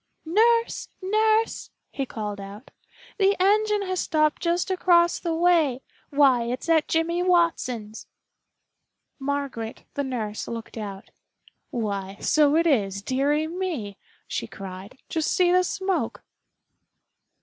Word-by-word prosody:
"Nurse, 460 +7 +2
nurse!" 435 +3 +1 0.2
he 275 -2 -3
called 210 -3 -5
out. 200 +5 -10 0.5
"The 395 0 +4
engine 420 +2 +3
has 370 -1 -2
stopped 305 -1 +1
just 345 +2 0
across 345 -2 +3
the 335 -2 -2
way. 325 -7 +2 0.3
Why, 270 -4 +4
it's 250 +6 -4
at 320 -2 +3
Jimmy 335 +2 0
Watson's." 330 -12 0 1.1
Margaret, 275 -5 -4
the 285 - -2
nurse, 225 -6 -4
looked 230 0 -7
out. 200 -3 -7 0.6
"Why, 200 -4 -3
so 295 -1 +3
it 335 +1 +3
is, 200 - +1
dearie 285 +6 +1
me!" 320 - -4 0.3
she - - -3
cried. 195 +4 -9
"Just 320 -1 -1
see 360 -1 +3
the 365 0 +4
smoke." 380 0 -2
300 Hz, 120 wpm, -25 LUFS, 230-360 Hz, 1.1 s, The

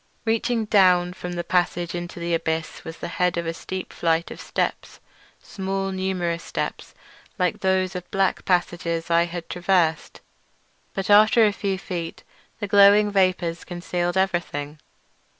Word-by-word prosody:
Reaching 225 0 0
down 180 -4 +4
from 180 -1 -6
the 175 0 -3
passage 175 -1 0
into 175 0 -6
the 170 0 -2
abyss 160 -1 -2
was 160 0 -8
the - - -5
head 180 0 0
of 170 - -2
a 165 - -2
steep 185 +2 -6
flight 165 0 0
of - - -8
steps—small 195 0 -4
numerous 185 -3 -2
steps - - -5 0.4
like 180 -3 0
those 190 0 +1
of 180 - -3
the - - -37
black 195 -2 0
passages 175 -2 -1
I 170 0 +4
had 175 0 -6
traversed—but 170 - -3
after 215 +2 +7
a 205 - +2
few 195 -2 -2
feet 175 -3 -6 0.4
the 205 - -3
glowing 205 +1 +6
vapours 185 -4 +1
concealed 175 0 -3
everything. 160 -6 -1
180 Hz, 145 wpm, -23 LUFS, 170-190 Hz, 0.4 s, after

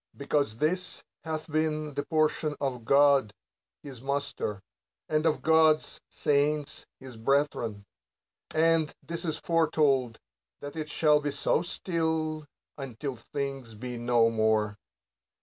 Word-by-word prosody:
Because 140 -5 0
this 180 +6 -1 0.2
hath 160 -1 -4
been 155 -1 0
the 145 +1 -2
portion 155 -1 +1
of 125 -4 -3
God 140 -4 +5 0.5
his 130 -5 -9
Master, 140 -7 -3 0.4
and 155 +1 +1
of 150 -4 0
God's 160 0 +3
saints 145 0 0
his 130 -3 -10
brethren; 115 -5 0 0.6
and 160 -1 +3
this 170 0 -5
is 160 -2 -1
foretold, 145 -7 +2 0.4
that 145 +1 -8
it 155 -1 -4
shall 150 -1 +3
be 145 - -1
so 145 +2 +1
still, 160 -3 -2 0.3
until 135 0 -5
things 135 -1 -5
be 125 +3 -6
no 120 -1 +3
more. 110 -1 +1
145 Hz, 120 wpm, -28 LUFS, 125-155 Hz, 0.6 s, God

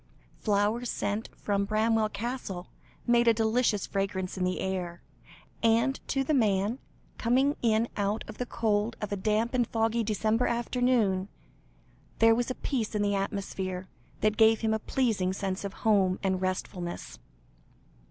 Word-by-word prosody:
Flowers 215 +3 +1
sent 205 +2 -2
from 200 -1 0
Bramwell 215 +1 +2
Castle, 205 -4 -4 0.4
made 240 -1 +4
a 230 - +6
delicious 225 -1 +1
fragrance 195 -2 -2
in 185 - -2
the 180 0 0
air, 180 -2 -3 0.6
and 230 +4 +3
to 270 0 0
the 305 - 0
man, 215 -1 +2 0.4
coming 265 +5 +3
in 225 0 +2
out 205 +1 -1
of - - -10
the 250 - -2
cold 220 -1 0
of 210 -1 -4
a - - +1
damp 215 +4 0
and 245 -3 +2
foggy 225 +1 +1
December 220 +2 +1
afternoon, 235 -5 +1 0.9
there 225 0 +6
was 240 +2 0
a 255 - -2
peace 230 -6 -2
in 210 - +1
the 205 0 +1
atmosphere, 195 -2 -3 0.3
that 215 0 +2
gave 220 -1 +5
him 220 -1 +1
a 220 - 0
pleasing 210 -7 0
sense 190 0 -3
of 200 -1 -4
home 195 -4 +4
and 190 -1 0
restfulness. 185 -1 -4
215 Hz, 150 wpm, -29 LUFS, 195-235 Hz, 0.9 s, a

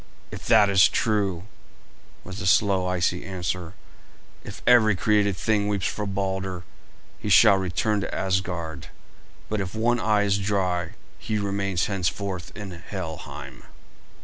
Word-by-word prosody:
"If - - -8
that 110 -3 +6
is 95 -2 +6
true," 100 -6 0 0.8
was 95 +3 -8
the 105 - -2
slow, 95 0 +3
icy 90 -1 0
answer, 90 -1 -4 0.7
"if - - -10
every 115 -4 +5
created 100 -1 +2
thing 105 0 +1
weeps 100 -2 -1
for 105 -1 -2
Balder, 95 -2 -3 0.6
he 105 - -4
shall 100 +1 +7
return 95 +3 0
to - - -4
Asgard; 90 -5 -2 0.6
but 110 -1 -2
if 95 +2 -5
one 120 +2 +1
eye 105 -2 +2
is 100 0 +1
dry 95 -4 -1 0.3
he 110 - -2
remains 100 -3 -1
henceforth 95 -1 -3
in 100 -3 -7
Helheim." 80 -7 -8
95 Hz, 135 wpm, -25 LUFS, 90-105 Hz, 0.8 s, shall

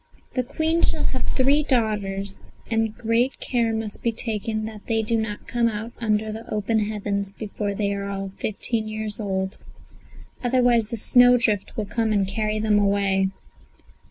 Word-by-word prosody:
"The 255 - +1
Queen 320 +6 0
shall - - +1
have 260 - -1
three 275 +3 +3
daughters, 205 -7 -1 0.3
but 225 -1 0
great 235 +3 +1
care 235 -3 +1
must 220 -2 -4
be 235 - +1
taken 220 -1 -2
that 215 -2 -9
they 225 -1 +1
do 230 +2 0
not 220 -2 -3
come 240 -1 +2
out 220 +1 -3
under 215 -1 0
the 220 +1 -8
open 215 +1 +1
heavens 205 -2 -2
before 205 -1 -4
they 200 0 0
are 200 0 -3
all 195 0 -3
fifteen 220 +1 -2
years 215 0 -4
old; 190 -2 -2 0.8
otherwise 245 -3 +3
a 230 - -2
snowdrift 245 -3 +4
will 215 - -1
come 225 +2 0
and 200 -2 +2
carry 215 +2 -1
them 215 -1 +3
away." 200 -1 +2
215 Hz, 160 wpm, -24 LUFS, 205-230 Hz, 0.8 s, snowdrift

